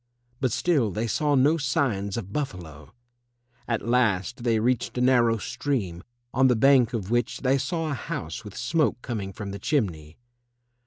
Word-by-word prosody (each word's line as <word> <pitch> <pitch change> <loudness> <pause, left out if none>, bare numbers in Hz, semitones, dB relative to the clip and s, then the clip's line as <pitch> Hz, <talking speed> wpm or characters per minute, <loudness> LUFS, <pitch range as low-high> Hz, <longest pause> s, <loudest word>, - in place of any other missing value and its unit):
But 130 -3 0
still 140 -5 +2
they 105 +4 -2
saw 145 +6 +1
no 145 +5 +4
signs 120 -9 -1
of 100 -3 -6
buffalo. 85 - -5 0.8
At 115 -2 -2
last 120 -1 +1
they 115 -2 +2
reached 125 +2 0
a - - +1
narrow 120 -3 +4
stream, 110 -8 -3 0.3
on 130 +1 +4
the 125 - +3
bank 130 0 +5
of 105 -3 -3
which 120 +1 0
they 135 +1 +2
saw 160 +3 -2
a - - 0
house 115 - -5
with 105 -2 -10
smoke 155 -6 +1
coming 105 -6 -4
from 100 0 -7
the 100 - -6
chimney. 85 - -2
120 Hz, 165 wpm, -26 LUFS, 100-135 Hz, 0.8 s, bank